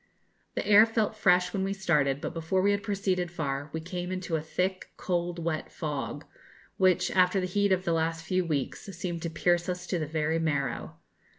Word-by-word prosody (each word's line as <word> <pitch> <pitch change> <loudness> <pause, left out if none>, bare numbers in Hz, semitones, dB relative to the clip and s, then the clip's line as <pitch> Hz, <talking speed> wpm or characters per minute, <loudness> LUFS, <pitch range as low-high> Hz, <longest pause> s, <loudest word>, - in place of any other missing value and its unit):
The - - -2
air 210 +2 +7
felt 220 -1 0
fresh 180 -4 +3
when 190 - 0
we 195 +1 -1
started, 150 -8 +1
but - - -4
before 165 +3 0
we 200 - +4
had 200 0 0
proceeded 195 -4 -1
far 145 -4 -3
we 160 - -3
came 180 +2 -5
into 185 -3 -2
a 155 - 0
thick, 185 +4 -2
cold, 175 -1 -1
wet 165 -2 -3
fog, 150 -1 -4 0.5
which, 185 -2 +3
after 185 +1 +4
the 185 - -1
heat 200 +2 +1
of 185 0 +2
the 170 - +1
last 165 0 -1
few 185 +2 +1
weeks, 150 -6 -2
seemed 175 -4 -3
to 170 - -2
pierce 175 +2 +1
us 180 0 -3
to 180 -2 -1
the 155 - -2
very 160 +1 0
marrow. 140 -6 -1
175 Hz, 200 wpm, -28 LUFS, 160-185 Hz, 0.5 s, air